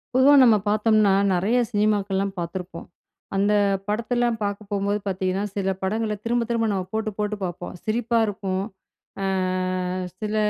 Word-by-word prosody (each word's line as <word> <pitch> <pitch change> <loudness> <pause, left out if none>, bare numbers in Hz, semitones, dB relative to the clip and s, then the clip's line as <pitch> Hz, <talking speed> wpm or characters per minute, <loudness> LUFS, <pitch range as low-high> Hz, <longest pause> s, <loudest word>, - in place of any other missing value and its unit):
பொதுவா 270 +3 +6
நம்ம 230 -4 +6
பார்த்தம்ன்னா, 215 -1 +3 0.2
நெறைய 200 +8 +2
சினிமாக்கள்லாம் 205 -3 0
பார்த்துருப்போம். 175 0 -6 0.5
அந்த 200 +2 +2 0.3
படத்த 215 +3 -2
எல்லாம் 240 -1 +1
பார்க்க 205 0 -3
போம்போது 200 +1 0
பார்த்தீங்கன்னா, 190 0 -1
சில 195 -1 0
படங்கள 215 +2 -1
திரும்ப, 240 +1 +1
திரும்ப 230 -1 +1
நம்ம 190 -2 -2
போட்டு, 220 0 -1
போட்டு 210 0 -1
பார்ப்போம். 175 -1 -5
சிரிப்பா 230 +2 0
இருக்கும். 195 -2 -2 0.6
அ - - 0 0.9
சில 215 0 -3
210 Hz, 135 wpm, -24 LUFS, 195-220 Hz, 0.9 s, பொதுவா